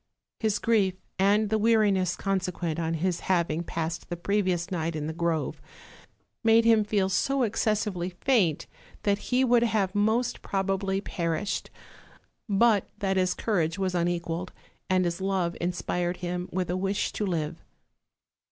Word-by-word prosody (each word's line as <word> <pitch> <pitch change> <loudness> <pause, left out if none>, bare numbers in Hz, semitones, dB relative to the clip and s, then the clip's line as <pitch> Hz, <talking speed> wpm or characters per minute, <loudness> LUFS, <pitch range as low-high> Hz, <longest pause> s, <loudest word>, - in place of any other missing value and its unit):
His 215 -3 +1
grief, 205 -5 +2 0.2
and 205 +2 +3
the 220 - +2
weariness 205 -5 +3
consequent 180 -4 -2
on 165 0 -1
his 175 +2 -1
having 170 -3 0
passed 165 0 -4
the 175 - -3
previous 185 -2 0
night 165 -2 -2
in 150 -1 -3
the 160 - -3
grove, 165 -3 -1 0.8
made 225 0 +5
him 225 -2 +5
feel 205 -2 +1
so 270 +8 +1
excess 215 -1 +1
ively 180 -3 -4
faint 205 - +2 0.4
that 200 -1 +2
he 255 +1 +3
would 240 -1 +4
have 215 -5 +1
most 220 +4 +1
probably 195 0 -1
perished, 170 +2 -2 0.8
but 205 0 +3
that 195 -1 0
his 185 -1 +1
courage 170 -6 0
was 190 -2 -1
unequaled, 175 0 -1 0.4
and 185 -1 +3
his 170 +2 -2
love 190 -3 0
inspired 175 0 -1
him 180 0 -4
with 180 -1 -1
a - - 0
wish 195 +2 -1
to - - -2
live. 165 -6 -2
190 Hz, 150 wpm, -27 LUFS, 175-210 Hz, 0.8 s, made